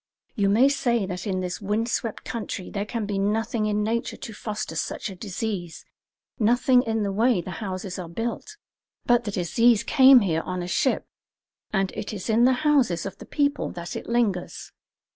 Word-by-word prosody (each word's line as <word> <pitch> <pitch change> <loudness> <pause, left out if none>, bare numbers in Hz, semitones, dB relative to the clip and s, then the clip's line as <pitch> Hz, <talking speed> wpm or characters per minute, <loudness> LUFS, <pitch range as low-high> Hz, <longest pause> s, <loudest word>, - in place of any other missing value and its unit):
You 200 -2 +1
may 230 +7 +5
say 240 -6 +1
that 180 +1 -5
in 185 -2 -1
this 180 +2 -4
wind 210 +3 0
swept 230 -2 -3
country 215 -5 -5
there 205 0 -3
can 225 0 -3
be 200 -1 -2
nothing 215 +2 0
in 210 0 0
nature 230 +2 -2
to 220 - -8
foster 210 -5 -5
such 200 +6 -3
a - - -9
disease, 185 -4 -5 0.5
nothing 245 +3 +4
in 225 -3 -1
the 200 - -1
way 225 +1 +2
the 185 - -6
houses 190 -2 -4
are 175 -2 -6
built; 235 - -4 0.5
but 240 -1 +3
the 205 - -2
disease 225 +5 +3
came 265 -3 +7
here 165 -5 0
on 180 0 -4
a - - -5
ship, 260 +8 +1 0.7
and 195 -2 0
it 210 - -5
is 210 +2 -3
in 230 +2 +4
the 260 - +5
houses 255 - +3
of 195 -1 -7
the - - -11
people 285 -1 0
that 170 0 -6
it - - -6
lingers. 225 -7 -1
210 Hz, 190 wpm, -25 LUFS, 190-235 Hz, 0.7 s, came